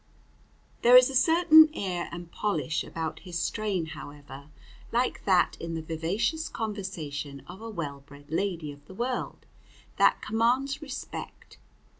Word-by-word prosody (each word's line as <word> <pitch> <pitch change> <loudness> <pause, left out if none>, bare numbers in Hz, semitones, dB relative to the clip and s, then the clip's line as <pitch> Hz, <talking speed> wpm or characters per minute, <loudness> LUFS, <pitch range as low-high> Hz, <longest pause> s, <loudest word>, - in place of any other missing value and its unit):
There 245 +1 +8
is 255 +1 +6
a - - -5
certain 315 +2 +7
air 180 -3 -3
and 170 0 -8
polish 195 -6 -1
about 160 -1 -5
his 180 -2 -6
strain, 195 -1 -1
however, 145 -2 -10 0.4
like 245 +2 0
that 185 -3 +3
in 165 0 -4
the 160 - -3
vivacious 195 - -1
conversation 160 -10 -5
of 190 - -11
a 225 - -6
well 150 -9 -5
bred 145 +1 -16
lady 170 -3 -1
of 145 0 -14
the 190 - -12
world, 245 +3 -3 0.5
that - - +4
commands 255 +6 +1
respect. 280 -4 -8
185 Hz, 140 wpm, -28 LUFS, 160-235 Hz, 0.5 s, There